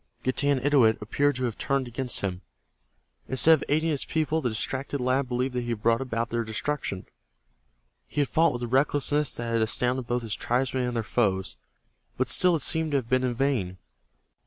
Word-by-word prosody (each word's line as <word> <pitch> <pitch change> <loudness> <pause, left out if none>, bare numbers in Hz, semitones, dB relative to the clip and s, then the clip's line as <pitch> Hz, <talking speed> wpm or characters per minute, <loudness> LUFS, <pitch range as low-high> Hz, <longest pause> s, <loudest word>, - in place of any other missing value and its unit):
Getanittowit 130 -3 +2
appeared 145 +7 0
to 130 - -3
have 120 -4 -3
turned 135 -2 0
against 125 +1 -3
him. 95 -2 -3 0.9
Instead 130 +5 +5
of 155 - +2
aiding 155 +3 +2
his 145 - 0
people, 160 0 -1
the 125 - 0
distracted 135 +5 -3
lad 130 +2 +1
believed 125 +1 -1
that 125 - -1
he 120 - -5
had 115 -2 -3
brought 115 +1 +3
about 115 -3 -3
their 115 0 0
destruction. 110 -3 -3 1.0
He 150 - -1
had 140 - +1
fought 165 0 +3
with 120 0 -5
a - - -2
recklessness 145 +2 +1
that 115 -1 -4
had 115 - +2
astounded 125 +3 0
both 120 0 -1
his 110 -2 -4
tribesmen 130 +2 -1
and 125 -1 -3
their 115 - -1
foes, 100 -3 0 0.6
and 130 - 0
still 175 +7 +4
it 150 - 0
seemed 160 -2 +1
to - - +4
have 120 -4 -4
been 130 0 +2
in 125 -2 -1
vain. 115 -9 -1
130 Hz, 195 wpm, -26 LUFS, 115-140 Hz, 1.0 s, Instead